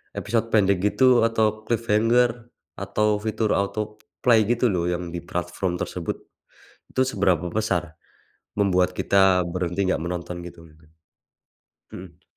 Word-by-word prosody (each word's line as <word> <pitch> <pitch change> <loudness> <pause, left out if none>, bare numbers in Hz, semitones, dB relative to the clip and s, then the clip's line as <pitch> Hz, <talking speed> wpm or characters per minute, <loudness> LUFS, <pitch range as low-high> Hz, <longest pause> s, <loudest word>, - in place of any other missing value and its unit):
episode 115 +2 -1
pendek 100 -4 +3
gitu 125 +3 +4
atau 110 -1 0
cliffhanger, 115 +1 +2 0.5
atau 100 +2 0 0.2
fitur 110 0 -1
autoplay 105 +2 0
gitu 120 +1 +2
loh 85 -1 0
yang 90 0 -3
di 85 - -3
platform 90 +1 -3
tersebut? - - -3 0.8
Itu 130 - +1
seberapa 95 - +1
besar, 90 -7 -1 0.7
membuat 90 -2 +2
kita 95 -2 +3
berhenti 90 +2 -2
nggak - - 0
menonton 90 0 -5
gitu 85 -1 -13
mungkin? 75 0 -22 1.1
Mhm. 90 -1 -11
100 Hz, 120 wpm, -24 LUFS, 90-110 Hz, 1.1 s, gitu